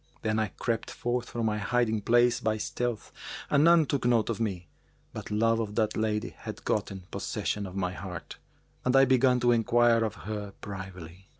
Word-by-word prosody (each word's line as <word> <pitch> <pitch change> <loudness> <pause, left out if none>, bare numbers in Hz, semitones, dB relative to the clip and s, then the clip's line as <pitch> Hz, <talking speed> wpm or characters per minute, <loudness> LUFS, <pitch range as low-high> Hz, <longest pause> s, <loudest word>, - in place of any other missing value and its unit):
Then 110 0 +1
I 110 - +1
crept 115 +2 -3
forth 120 0 -2
from 115 -1 -2
my 105 -1 0
hiding 110 -1 +1
place 120 +2 +3
by 110 0 0
stealth, 120 +1 -3 0.4
and 145 0 +5
none 170 -1 +6
took 140 -2 -1
note 120 -2 +2
of 115 - -4
me, 95 -6 -3 0.5
but - - -7
love 115 +2 +2
of 105 -2 -3
that 110 -2 +1
lady 110 -1 -1
had - - -8
gotten 100 -2 -1
possession 105 -1 -3
of 90 - -10
my 90 -2 -1
heart, 90 -2 -8 0.4
and 125 +1 +2
I 135 0 +7
began 130 -1 +4
to 120 0 +4
enquire 120 0 +4
of 110 - -2
her 105 -1 -5
privily. 95 -2 -9
110 Hz, 185 wpm, -28 LUFS, 105-120 Hz, 0.5 s, I